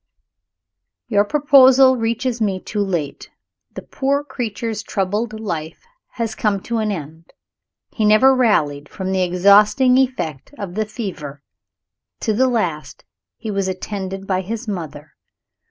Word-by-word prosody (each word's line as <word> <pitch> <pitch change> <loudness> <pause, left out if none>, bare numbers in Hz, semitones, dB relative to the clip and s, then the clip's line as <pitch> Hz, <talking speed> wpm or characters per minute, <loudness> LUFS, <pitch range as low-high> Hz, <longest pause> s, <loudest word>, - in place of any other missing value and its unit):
Your 205 -3 +3
proposal 265 -1 +5
reaches 235 +1 -2
me 195 -3 0
too 210 - -5
late. 175 -8 -3 0.5
The - - -7
poor 280 +1 -1
creature's 230 -5 -4
troubled 210 +3 -2
life 165 -7 -5 0.3
has 230 -2 -3
come 210 -2 0
to 235 -1 -2
an 215 -1 -1
end. 160 -2 -8 0.6
He 220 - -2
never 215 +6 +5
rallied 150 - +1
from 190 0 -5
the 190 -1 0
exhausting 205 +8 +4
effect 255 - -2
of 195 -3 -6
the 215 +2 -2
fever. 160 - -7 0.8
To 220 - 0
the 260 +5 +2
last 180 -11 -3 0.3
he 220 - -5
was 195 -1 -1
attended 190 0 -5
by 185 -1 0
his 225 +5 -6
mother. 155 -6 -6
210 Hz, 135 wpm, -19 LUFS, 185-235 Hz, 0.8 s, proposal